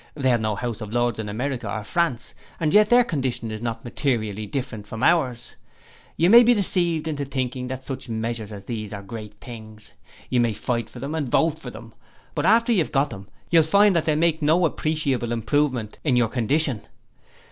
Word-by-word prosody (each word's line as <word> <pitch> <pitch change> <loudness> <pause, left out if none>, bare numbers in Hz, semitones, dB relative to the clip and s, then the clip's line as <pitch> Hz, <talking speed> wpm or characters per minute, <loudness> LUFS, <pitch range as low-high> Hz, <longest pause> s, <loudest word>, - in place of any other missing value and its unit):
They 135 -3 +1
have 120 -2 +2
no 110 -1 -1
House 120 -1 -4
of 110 +2 -6
Lords 120 -2 +1
in 105 -1 -4
America 120 0 -3
or 110 0 -3
France, 130 -1 -1 0.3
and 155 0 0
yet 210 0 +6
their 245 +1 +6
condition 130 - -2
is 110 0 -6
not 115 0 -4
materially 110 -5 -2
different 120 -3 -5
from 115 +3 -6
ours. 130 -9 +1 0.6
You 170 - +3
may 235 +1 +10
be 240 0 +5
deceived 175 -5 +2
into 145 -2 -2
thinking 130 -2 -3
that 130 0 -6
such 130 -2 -6
measures 110 -1 -3
as 100 -2 -9
those 110 -3 -5
are 100 -1 -7
great 105 +1 -8
things. 110 -3 -10 0.3
You 125 - +1
may 120 -2 +2
fight 115 +1 -2
for - - -13
them 140 +5 -5
and 150 -5 -2
vote 160 +4 +2
for - - -8
them, - - -12 0.4
but - - 0
after 230 +1 +4
you 205 - +3
have 160 - -1
got 140 +1 +1
them 100 0 -9 0.2
you 170 - +6
will - - +5
find 200 +5 +4
that 165 - +1
they 155 - +2
will 150 - 0
make 165 -2 +2
no 160 +4 +3
appreciable 145 -7 -1
improvement 120 -1 -1
in 135 -5 +2
your 120 -2 +3
condition. 125 +1 0
125 Hz, 210 wpm, -23 LUFS, 115-155 Hz, 0.6 s, may